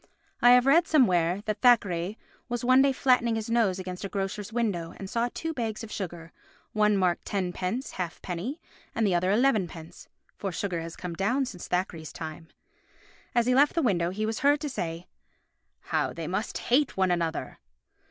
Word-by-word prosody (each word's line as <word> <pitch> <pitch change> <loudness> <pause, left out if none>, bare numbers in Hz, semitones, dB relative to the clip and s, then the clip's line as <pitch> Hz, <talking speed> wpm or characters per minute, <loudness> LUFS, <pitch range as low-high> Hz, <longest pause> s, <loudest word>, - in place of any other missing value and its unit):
I 245 - +7
have 250 0 +5
read 325 +5 +5
somewhere 185 - +3
that 215 -1 -3
Thackeray 205 -5 +3 0.3
was 240 0 -2
one 255 +1 +6
day 275 0 +4
flattening 250 -3 +2
his 225 0 -3
nose 220 -6 +2
against 185 -1 -6
a 195 - -4
grocer's 200 +1 -4
window 200 -8 -2
and 195 - -7
saw 235 +4 0
two 325 0 -4
bags 225 -5 -3
of 220 - -8
sugar, 170 -3 -6 0.4
one 210 -1 +3
marked 180 -2 +1
tenpence 190 +5 -3
halfpenny 180 - -5 0.4
and 225 - +1
the 195 - +2
other 175 +1 +1
elevenpence 200 -9 0 0.3
(for 195 - -2
sugar 175 -1 -3
has 165 0 -7
come 180 -2 -6
down 230 +10 +1
since 185 -8 -8
Thackeray's 175 -3 -2
time). 160 0 -8 0.9
As 240 -1 +3
he 250 - +3
left 285 +3 +4
the 335 - +1
window 175 -8 +2
he 210 +4 -2
was 220 0 -2
heard 290 +1 +4
to 300 - -2
say, 170 -8 -4 0.8
"How - - -1
they - - -5
must - - -2
hate 265 0 +1
one 190 -1 +2
another!" 165 -2 -2
205 Hz, 180 wpm, -27 LUFS, 180-245 Hz, 0.9 s, I